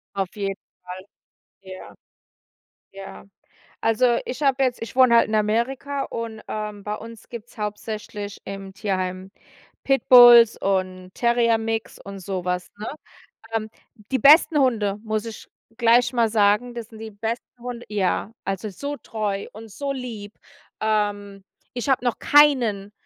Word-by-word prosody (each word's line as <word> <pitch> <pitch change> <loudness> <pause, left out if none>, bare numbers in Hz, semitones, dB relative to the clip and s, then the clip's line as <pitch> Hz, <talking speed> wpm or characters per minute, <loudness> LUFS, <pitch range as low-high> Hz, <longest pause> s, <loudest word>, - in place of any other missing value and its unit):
Auf 195 +1 -3
jeden 195 -1 -3 0.3
Fall, 180 +1 -9 0.6
ja. 185 0 -11 1.0
Ja. 195 0 -11 0.6
Also, 235 +2 +2
ich 250 - -6
habe 275 -2 +2
jetzt 250 -2 -1
ich 230 +1 -7
wohne 255 -3 +6
halt - - +4
in 215 - -1
Amerika 250 +6 -1
und, 230 -1 -6
ähm, 210 -1 -5
bei 210 +1 -3
uns 230 0 -12
gibt's 235 -1 -10
hauptsächlich 210 -1 -6
im 195 0 -8
Tierheim 185 -2 -3 0.5
Pitbulls 240 -4 +7
und 185 -1 -2
Terrier 235 -1 +2
Mix 225 0 -4
und 200 0 -9
so 185 -1 -4
was, 180 0 -2
ne? 215 - -5 0.7
Ähm, 220 -1 -2 0.4
die 265 - +2
besten 300 +4 +6
Hunde, 220 -7 +1
muss 215 -1 -2
ich 225 -1 -9 0.3
gleich 240 +1 +3
mal 235 -2 +2
sagen, 210 +3 +2
das 235 -2 -7
sind 225 - -13
die 220 0 -8
besten 225 +3 -4 0.2
Hunde 245 -1 -7
ja, 205 +1 -1
also, 195 +2 -3
so 285 +9 -6
treu 210 -5 -4
und 220 +1 -11
so 280 +6 -4
lieb, 230 -6 -7 0.5
ähm, 205 -2 -1 0.3
ich 245 +2 -4
habe 260 -2 +2
noch 245 - 0
keinen 240 -9 +3
220 Hz, 145 wpm, -23 LUFS, 200-240 Hz, 1.0 s, Pitbulls